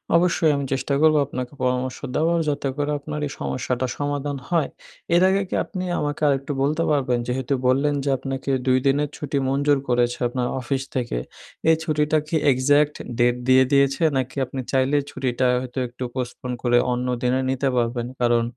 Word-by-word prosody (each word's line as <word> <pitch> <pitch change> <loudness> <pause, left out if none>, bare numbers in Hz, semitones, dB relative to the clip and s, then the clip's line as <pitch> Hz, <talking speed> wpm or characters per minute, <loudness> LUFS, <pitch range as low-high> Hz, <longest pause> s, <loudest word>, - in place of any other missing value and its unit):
অবশ্যই 170 -2 +3
আমি 140 -1 -2
চেষ্টা 140 +1 -1
করব। 155 -1 +5
আপনাকে 130 -1 -5
পরামর্শ 125 0 0 0.2
দেওয়ার, 165 +2 +2
যাতে 145 -1 -1
করে 145 0 -1
আপনার 150 +1 -5
এই - - -8
সমস্যাটা 130 0 -2
সমাধান 145 -1 -2
হয়। 165 -5 +1 0.5
এর 175 - +5
আগে 195 +1 +2
কী - - -2
আপনি 185 -2 -5 0.2
আমাকে 145 +1 -3
আরেকটু 140 +1 0
বলতে 155 +4 +1
পারবেন? 130 -4 +1
যেহেতু 130 +2 -1
বললেন 140 +3 +2
যে 140 - -1
আপনাকে 135 +1 -4 0.2
২ 130 0 +5
দিনের 145 +1 +2
ছুটি 145 -1 -3
মঞ্জুর 145 +1 +2
করেছে 120 0 +2
আপনার 125 0 -2
অফিস 135 +2 -2
থেকে। 120 - -1 0.5
এই 160 - +6
ছুটিটা 150 0 +1
কী 165 - -2 0.2
এক্সাক্ট 145 +3 +3 0.2
ডেট 120 0 +3
দিয়ে 130 0 +6
দিয়েছে? 140 +3 +3
নাকি 130 0 -2
আপনি 130 - -7
চাইলেই 135 +2 +2
ছুটিটা 130 -1 -1
হয়তো 130 +1 -5
একটু 120 +2 -8
postpone 125 0 -4
করে 120 -1 +4 0.2
অন্যদিনে 125 +1 0
নিতে 135 +1 0
পারবেন? 120 0 0
কারণ 120 -1 +3
135 Hz, 170 wpm, -23 LUFS, 125-145 Hz, 0.5 s, এই